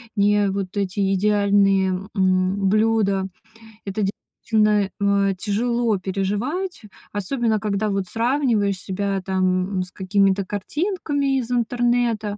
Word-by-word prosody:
не 205 Hz, 0 st, +3 dB
вот 195 Hz, 0 st, -4 dB
эти 195 Hz, 0 st, 0 dB
идеальные, 200 Hz, -1 st, +3 dB, 0.3 s
м, 190 Hz, +1 st, +2 dB
блюда. 215 Hz, -3 st, +2 dB, 0.6 s
Это 200 Hz, +1 st, -3 dB
действительно, 210 Hz, 0 st, 0 dB
э, 200 Hz, -1 st, +2 dB
тяжело 225 Hz, +2 st, 0 dB
переживать, 210 Hz, -, -3 dB, 0.3 s
особенно 220 Hz, +2 st, 0 dB
когда 210 Hz, 0 st, -1 dB
вот 195 Hz, -2 st, -1 dB
сравниваешь 230 Hz, -5 st, +1 dB
себя, 195 Hz, 0 st, -2 dB
там, 185 Hz, 0 st, 0 dB
с 180 Hz, -, -11 dB
какими-то 195 Hz, 0 st, +1 dB
картинками 285 Hz, -, -1 dB
из 245 Hz, 0 st, -5 dB
интернета. 240 Hz, -3 st, 0 dB
205 Hz, 105 wpm, -22 LUFS, 195-225 Hz, 0.6 s, не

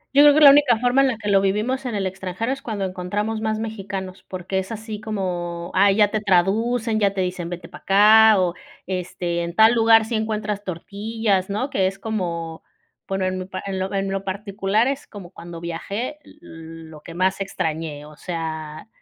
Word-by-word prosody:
Yo 285 Hz, -, +8 dB
creo 290 Hz, 0 st, +7 dB
que 310 Hz, -, +4 dB
la 285 Hz, -2 st, +11 dB
única 280 Hz, -5 st, +5 dB
forma 245 Hz, +3 st, +3 dB
en 275 Hz, -, +4 dB
la 250 Hz, -4 st, -1 dB
que 210 Hz, -1 st, -7 dB
lo 195 Hz, -1 st, +5 dB
vivimos 220 Hz, +7 st, -1 dB
en 235 Hz, -, -3 dB
el 200 Hz, -1 st, -1 dB
extranjero 190 Hz, +5 st, -3 dB
es 270 Hz, 0 st, -4 dB
cuando 215 Hz, -7 st, -3 dB
encontramos 205 Hz, +4 st, -3 dB
más 220 Hz, 0 st, -1 dB
mexicanos 195 Hz, -4 st, -6 dB
porque, 185 Hz, +1 st, -3 dB
es 190 Hz, +3 st, -6 dB
así 220 Hz, -1 st, -6 dB
como 175 Hz, -5 st, -4 dB
ah, 200 Hz, +1 st, +5 dB
ya 205 Hz, +1 st, +4 dB
te 215 Hz, -, -1 dB
traducen, 215 Hz, +4 st, +1 dB
ya 200 Hz, -1 st, +1 dB
te 190 Hz, -, 0 dB
dicen 180 Hz, -2 st, -3 dB
vete 175 Hz, -1 st, -7 dB
para 180 Hz, -, -13 dB
acá 215 Hz, +2 st, +6 dB
o, 180 Hz, -2 st, +1 dB, 0.3 s
este, 175 Hz, -1 st, -3 dB
en 170 Hz, 0 st, -5 dB
tal 220 Hz, +3 st, +6 dB
lugar 225 Hz, -1 st, +5 dB
sí 230 Hz, -, -5 dB
encuentras 215 Hz, -2 st, -2 dB
tortillas, 200 Hz, +2 st, -2 dB
¿no? 250 Hz, +8 st, -2 dB
Que 190 Hz, -1 st, +2 dB
es 195 Hz, +1 st, -4 dB
como 170 Hz, -7 st, -4 dB, 0.5 s
bueno 195 Hz, -1 st, -1 dB
en 185 Hz, 0 st, -2 dB
mi 185 Hz, -, -5 dB
pa 185 Hz, 0 st, -6 dB
en 195 Hz, -1 st, -3 dB
lo 190 Hz, +1 st, -3 dB
en 195 Hz, -1 st, -1 dB
lo 195 Hz, 0 st, -2 dB
particular 200 Hz, +3 st, -1 dB
es 275 Hz, +1 st, -3 dB
como 190 Hz, -5 st, -11 dB
cuando 170 Hz, -2 st, -9 dB
viajé, 200 Hz, -, -5 dB
l 300 Hz, -, -18 dB, 0.5 s
lo 150 Hz, -1 st, -12 dB
que 165 Hz, +2 st, -11 dB
más 190 Hz, +2 st, 0 dB
extrañé, 160 Hz, -5 st, -3 dB
o 150 Hz, 0 st, -13 dB
sea, 160 Hz, -1 st, -6 dB
195 Hz, 205 wpm, -22 LUFS, 180-220 Hz, 0.5 s, la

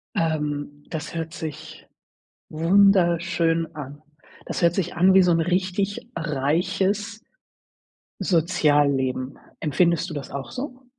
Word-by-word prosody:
Ähm, 145 Hz, -2 st, -2 dB
das 160 Hz, 0 st, -5 dB
hört 165 Hz, -1 st, -4 dB
sich 155 Hz, -5 st, -8 dB, 0.6 s
wunderschön 170 Hz, -2 st, +3 dB
an. 145 Hz, -1 st, -8 dB, 0.4 s
Das -, -, -4 dB
hört 170 Hz, 0 st, +4 dB
sich 190 Hz, -, -2 dB
an 185 Hz, +3 st, +4 dB
wie 190 Hz, -, +7 dB
so 180 Hz, -1 st, +3 dB
'n 165 Hz, -, +2 dB
richtig 185 Hz, +3 st, -1 dB
reiches 180 Hz, +8 st, -1 dB, 1.0 s
Sozialleben. 145 Hz, -6 st, +1 dB, 0.2 s
Empfindest 170 Hz, +3 st, +1 dB
du -, -, -6 dB
das 145 Hz, -2 st, -6 dB
auch 140 Hz, -1 st, -6 dB
so? 255 Hz, -1 st, -7 dB
165 Hz, 115 wpm, -24 LUFS, 150-185 Hz, 1.0 s, wie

